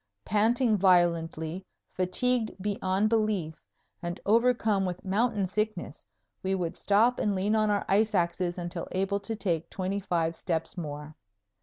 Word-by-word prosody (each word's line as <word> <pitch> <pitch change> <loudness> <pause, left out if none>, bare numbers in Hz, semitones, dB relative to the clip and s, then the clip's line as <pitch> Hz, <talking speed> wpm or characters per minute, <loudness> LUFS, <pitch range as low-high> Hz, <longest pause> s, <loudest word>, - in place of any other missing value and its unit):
Panting 220 +2 +2
violently, 170 -2 +2 0.3
fatigued 220 +4 0
beyond 195 0 0
belief, 215 -7 0 0.5
and 175 +1 -4
overcome 225 -2 +3
with 180 +1 -4
mountain 210 +1 +1
sickness, 215 +4 -3 0.4
we 190 0 0
would 175 -3 -3
stop 225 +5 +3
and 205 -2 +1
lean 195 +3 +1
on 215 -1 +2
our 205 -1 +1
ice 210 +2 +2
axes 175 0 0
until 175 -1 -5
able 195 +2 0
to 210 +3 -4
take 170 -6 -2
twenty 190 +1 -2
five 170 -4 -1
steps 165 -2 -3
more. 150 -3 -6
195 Hz, 140 wpm, -28 LUFS, 175-215 Hz, 0.5 s, overcome